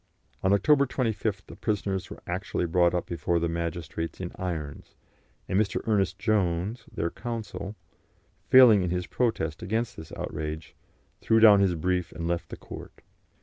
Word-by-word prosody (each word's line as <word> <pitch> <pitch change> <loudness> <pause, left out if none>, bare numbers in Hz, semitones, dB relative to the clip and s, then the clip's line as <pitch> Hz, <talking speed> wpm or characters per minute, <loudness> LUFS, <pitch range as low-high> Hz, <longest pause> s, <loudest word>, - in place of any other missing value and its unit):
On 95 - +2
October 140 +7 +4
25th 110 -5 -2
the - - -11
prisoners 100 -3 -2
were - - -10
actually 90 0 -2
brought 85 +1 +3
up 90 - -1
before 85 +1 -1
the 85 0 +1
magistrates 85 -1 -4
in 90 -1 -4
irons, 80 -6 -5 0.5
and 95 - +1
Mr. 105 -2 +1
Ernest 100 -4 +1
Jones, 100 +1 0
their 85 - -2
counsel, 110 -3 -5 0.7
failing 125 -6 +8
in 90 - -1
his 90 0 -1
protest 85 -11 -1
against 115 +4 -2
this 80 - -10
outrage, 75 +1 -5 0.4
threw 115 - +3
down 105 -3 +8
his 95 -3 +3
brief 90 +2 -1
and 85 +2 -4
left 85 0 -2
the - - -7
court. - - -11
95 Hz, 155 wpm, -27 LUFS, 85-110 Hz, 0.7 s, failing